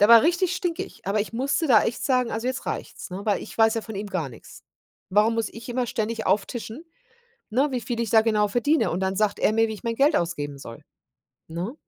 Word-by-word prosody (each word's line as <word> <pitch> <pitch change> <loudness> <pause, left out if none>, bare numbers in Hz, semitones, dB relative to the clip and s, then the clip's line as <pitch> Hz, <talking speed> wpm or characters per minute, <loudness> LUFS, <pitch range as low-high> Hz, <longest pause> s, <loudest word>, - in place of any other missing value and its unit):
Der 205 - +6
war 235 -1 +10
richtig 350 +3 +2
stinkig, 345 -3 -4
aber 200 +2 +1
ich 210 - -4
musste 280 +7 0
da 230 -7 +5
echt 235 - -2
sagen: 250 -3 +2
„Also 225 +3 -3
jetzt 260 - -4
reicht's“, - - -5
ne, 185 +2 -5
weil 205 - +1
ich - - -10
weiß 225 0 +4
ja 225 - -1
von 220 -1 -8
ihm 205 +1 -4
gar 165 -8 -2
nix. 115 - -14 0.5
Warum 210 +3 +3
muss 225 -2 -1
ich 230 +2 -10
immer 245 0 -1
ständig 225 0 -2
auftischen, 225 +7 -1 0.7
ne, 265 +7 +2
wie 250 - -1
viel 235 -1 -3
ich 230 - -1
da 220 -1 +6
genau 215 -2 +2
verdiene 265 +9 +2
und 175 - -2
dann 190 0 0
sagt 210 0 +1
er - - +3
mir, 225 +1 +3
wie 220 - -4
ich 210 - -13
mein 230 -1 -1
Geld 290 +4 +4
ausgeben 145 -4 -2
soll, 115 -3 -10 0.7
ne? 175 +8 -4
225 Hz, 235 wpm, -25 LUFS, 205-250 Hz, 0.7 s, war